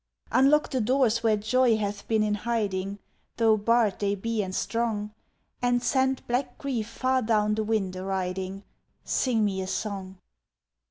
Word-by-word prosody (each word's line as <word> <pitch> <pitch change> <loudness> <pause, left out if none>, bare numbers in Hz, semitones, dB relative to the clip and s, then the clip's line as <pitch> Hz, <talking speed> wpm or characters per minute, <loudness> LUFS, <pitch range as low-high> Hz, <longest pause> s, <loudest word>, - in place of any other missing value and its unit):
Unlock 290 +3 +4
the 260 -3 0
doors 240 -1 +2
where 220 -2 +3
joy 230 +2 +3
hath 205 -1 -4
been 220 -1 +2
in 210 -1 +1
hiding, 205 -3 -2 0.4
Though 225 -2 +4
barred 220 -1 +2
they 200 0 0
be 225 +2 -2
and 185 -2 -4
strong, 220 -3 -2 0.5
And 245 0 +1
send 265 0 +1
black 245 +1 -2
grief 245 -6 -3
far 260 +2 0
down 215 -2 +2
the 220 0 0
wind 210 -4 -1
a 185 - -5
riding 190 0 -3 0.4
Sing 230 -5 +1
me 190 -2 -1
a 185 - -4
song. 190 -2 -4
215 Hz, 160 wpm, -27 LUFS, 200-240 Hz, 0.5 s, Unlock